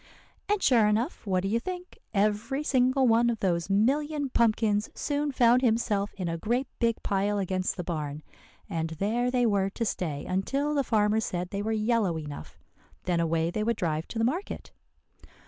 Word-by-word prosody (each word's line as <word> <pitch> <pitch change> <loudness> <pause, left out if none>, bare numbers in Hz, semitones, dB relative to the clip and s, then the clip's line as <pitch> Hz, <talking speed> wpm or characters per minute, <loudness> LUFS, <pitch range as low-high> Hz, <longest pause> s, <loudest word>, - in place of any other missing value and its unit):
"And 415 -1 +1
sure 230 -5 +5
enough, 225 - -1
what 185 -1 +1
do - - 0
you 225 +4 +1
think. 360 +5 -7
Every 215 +7 0
single 260 -1 +3
one 235 +1 +4
of 230 -2 -2
those 175 -2 0
million 285 +8 +1
pumpkins 215 -3 +2
soon 290 0 -1
found 245 -1 +4
himself 220 -4 +1
in 185 -3 -3
a 165 0 -3
great 240 +8 0
big 230 -1 0
pile 200 +1 0
against 185 -1 -1
the 180 - -3
barn, 155 -3 -4 0.4
and 165 -5 -2
there 235 +6 0
they 250 -1 +2
were 200 -3 +2
to 230 +4 -3
stay 155 -8 -3
until 270 +11 -1
the 285 -2 +2
farmer 215 -2 +2
said 180 -4 -3
they 200 - -2
were 220 +2 -2
yellow 215 -5 +1
enough. 150 -2 -8 0.5
Then 175 -2 0
away 165 0 +1
they 215 +3 -1
would 230 0 0
drive 160 -2 -1
to - - -7
the 225 - +2
market! 340 - -3
215 Hz, 180 wpm, -28 LUFS, 185-245 Hz, 0.5 s, sure